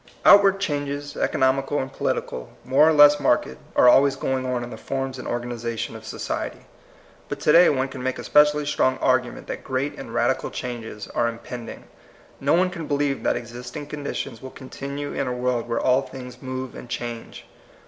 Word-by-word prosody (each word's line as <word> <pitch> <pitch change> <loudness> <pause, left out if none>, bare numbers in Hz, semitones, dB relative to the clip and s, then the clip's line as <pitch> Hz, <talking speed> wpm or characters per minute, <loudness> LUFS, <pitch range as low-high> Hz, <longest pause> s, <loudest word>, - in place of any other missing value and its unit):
OuTWABD 200 -1 +7
changes, 145 -4 -3
economical 135 +2 +1
and 135 -1 -3
polit - - 0
ical, 60 -1 -7 0.2
more 140 +5 +5
or - - +4
less 145 -1 +7
marked, 120 - +1 0.2
are - - +6
always 135 +2 +6
going 130 -1 -2
on 125 -1 -1
in 120 - -7
the - - -6
forms 135 -1 -4
and - - -7
organization 120 -1 -3
of - - -10
society. - - -4 0.6
But - - -4
to - - +4
day 175 +3 +7
one 135 -2 +1
can 135 -1 -8
make 130 0 -2
a - - -7
specially 150 0 +4
strong 130 -2 +1
argument 130 -1 0
that - - -6
great 135 +2 -2
and - - -8
radical - - 0
changes 115 -4 -6
are 120 - 0
impending. 115 0 -8 0.6
No 140 +4 +3
oi\e 185 +1 +3
can 170 -4 -6
believe 145 -1 0
that - - +1
existing 125 +4 -7
conditions 140 -4 -5
will 130 - -7
continue 140 +2 -6
in 135 - -2
a 125 - -1
world 125 -1 -1
where 115 - 0
all 130 +1 +3
things 125 -2 -10
move 130 -1 -5
and 125 - -10
change. 120 -1 -6
130 Hz, 190 wpm, -24 LUFS, 125-145 Hz, 0.6 s, OuTWABD